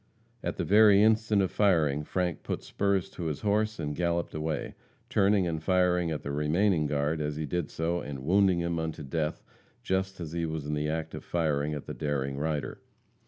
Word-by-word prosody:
At - - -3
the - - -1
very 105 0 +6
instant 110 -2 +3
of 95 - -1
firing, 80 -8 +2
Frank 90 +1 -2
put - - -4
spurs 100 -2 0
to 85 - -6
his 75 -3 -3
horse 110 +1 0
and 75 -2 -3
galloped 85 0 -1
away, 75 -1 -3 0.4
turning 100 -2 +3
and 80 -2 -2
firing 90 -1 +2
at 80 -2 -3
the 70 - -4
remaining 75 +3 +2
guard 75 +2 0
as 75 0 -2
he 75 +1 -3
did 85 +1 -2
so, 85 +2 -1
and 70 -2 -7
wounding 95 0 +3
him 85 -1 -1
unto 80 -2 -4
death 75 +3 -2 0.4
just 95 0 -1
as 80 -3 -5
he 85 0 -2
was 80 -2 -4
in 75 - -2
the 75 0 -1
act 80 0 -3
of - - -7
firing 75 -3 0
at 75 - -6
the - - -6
daring 70 -2 -2
rider. 75 -2 -3
80 Hz, 200 wpm, -29 LUFS, 75-95 Hz, 0.4 s, very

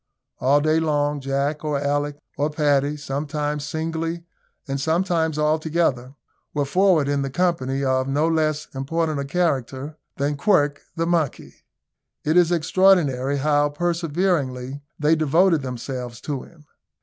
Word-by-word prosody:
All 140 +3 +3
day 155 +1 +2
long, 145 -2 0
Jack, 140 +3 -1
or 150 -2 0
Alick, 145 +1 -1 0.2
or 145 +2 0
Paddy, 145 -1 +1
sometimes 145 +1 -3
singly 165 +2 -3 0.4
and 135 0 -2
sometimes 160 -1 +1
all 155 +1 +2
together, 150 -5 -1 0.4
were 145 -1 +1
forward 180 -1 +3
in 145 0 0
the 135 - -2
company 140 -4 0
of 130 0 +1
no 145 +4 +1
less 155 -2 0
important 155 +3 -1
a 140 - -2
character 140 -2 -2 0.2
than 145 +1 -1
Quirk, 145 -4 +2
the 165 -1 0
monkey. 165 -5 -1 0.7
It 155 +2 +1
is 175 -1 +5
extraordinary 160 -6 +3
how 145 +1 +2
perseveringly 150 -5 -1 0.2
they 150 +2 +3
devoted 160 +2 +3
themselves 125 -1 -5
to 140 -4 -3
him. 155 -3 -17
150 Hz, 135 wpm, -23 LUFS, 140-165 Hz, 0.7 s, is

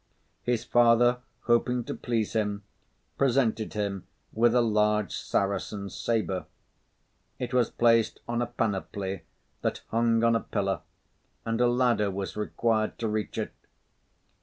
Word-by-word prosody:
His 120 -2 0
father, 120 +1 +4 0.2
hoping 120 +1 +2
to - - -5
please 115 -3 -2
him, 105 -2 -1 0.6
presented 120 -5 +2
him 100 -3 -3 0.3
with 115 +2 +3
a 125 - +5
large 105 -3 +2
Saracen 100 0 -2
sabre. 100 -1 -1 0.9
It 125 0 -4
was 125 -3 +3
placed 115 -2 +3
on 120 0 -1
a 120 - 0
panoply 100 -4 -2 0.4
that - - -2
hung 115 0 +2
on 115 0 +4
a - - +3
pillar, 95 -6 -2 0.6
and 115 +1 0
a 120 - +5
ladder 120 -4 +2
was 95 0 -4
required 110 +1 0
to 115 - -2
reach 105 -1 -2
it. - - -3
115 Hz, 135 wpm, -28 LUFS, 105-120 Hz, 0.9 s, a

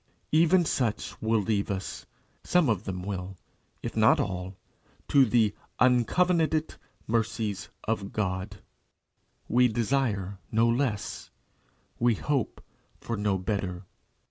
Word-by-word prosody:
Even 170 +3 +5
such 120 -7 -1
will 110 0 +2
leave 100 -1 0
us 95 -2 -4 0.4
some 175 -7 +3
of 105 -2 0
them 90 -2 -4
will, 95 -1 -5 0.5
if - - -4
not - - +5
all 95 -1 -3 0.5
to 140 -2 +5
the 110 -3 +3 0.3
"uncovenanted 155 +6 +3 0.3
mercies 110 -3 -1
of 105 -3 -2
God." 95 0 -3 0.8
We 125 +2 +4
desire 110 -5 -1
no 115 +1 +3
less; 115 -5 -1 0.7
we 120 -1 +3
hope 140 +1 -2 0.4
for 115 - -4
no 105 -2 0
better. 95 -1 -3
110 Hz, 115 wpm, -28 LUFS, 100-125 Hz, 0.8 s, Even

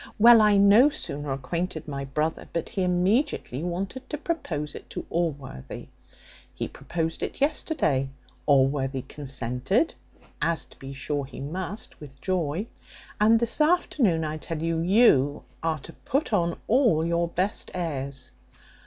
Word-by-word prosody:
Well, 230 +1 +8
I 210 -1 +5
no 205 +8 +7
sooner 145 - -4
acquainted 160 +5 -3
my 140 -2 -4
brother, 150 +4 -2
but 170 - -3
he 195 - -2
immediately 180 - +1
wanted 190 +10 -4
to 300 - -3
propose 160 - -3
it - - -10
to - - -6
Allworthy. 145 - -4 0.7
He - - -3
proposed 165 -1 -3
it - - -4
yesterday, 270 - +1 0.4
Allworthy 135 -1 +2
consented 135 - -1 0.5
(as 170 -1 +1
to - - -20
be 135 0 -8
sure 140 +1 -2
he 135 - -10
must 185 +8 -5
with 135 -3 -12
joy), 180 +1 -1 0.5
and 220 +2 +5
this 235 +5 +2
afternoon, 270 - +2
I 155 0 -3
tell 160 0 -5
you, 165 0 0
you 165 - +4 0.2
are 165 -1 0
to 160 +4 -12
put 275 -2 -2
on 170 -4 +1
all 230 - +3
your 170 0 +1
best 185 +5 -2
airs." 140 -6 -4
165 Hz, 145 wpm, -26 LUFS, 140-210 Hz, 0.7 s, Well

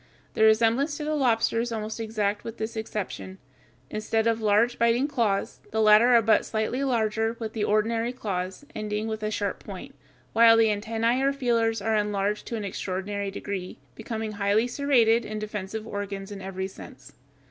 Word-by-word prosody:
The - - -2
resemblance 230 +7 +3
to 300 - -5
the 305 +1 -1
lobster 235 -5 +2
is 240 0 -3
almost 220 0 -4
exact 210 -2 -1
with 230 0 -7
this 220 +1 -4
exception: 210 -3 -5 0.5
instead 220 +1 -1
of 230 -1 +1
large 220 +3 +2
biting 235 +4 +3
claws, 230 -9 -1
the 220 - -2
latter 220 +3 +6
are 230 - +5
but 220 +1 +4
slightly 220 +5 -2
larger 225 -3 0
than 225 -2 -5
the 220 -2 -2
ordinary 225 +3 +1
claws, 190 -1 -4
ending 215 0 -3
with 220 -1 -4
a 215 - -1
sharp 205 -2 -3
point, 195 -3 -9 0.4
while 230 0 +7
the 220 -1 +4
antennæ 225 +4 0
or 275 +1 +3
feelers 230 -5 0
are 220 0 +1
enlarged 210 0 -1
to 235 - -3
an 215 -2 -4
extraordinary 195 +1 -3
degree, 195 -2 -5 0.2
becoming 220 - -5
highly 205 +2 +1
serrated 240 -3 +3
and 215 0 -5
defensive 210 0 -5
organs 200 -2 -5
in 200 -1 -7
every 190 0 -4
sense. 190 - -13
220 Hz, 175 wpm, -26 LUFS, 205-230 Hz, 0.5 s, while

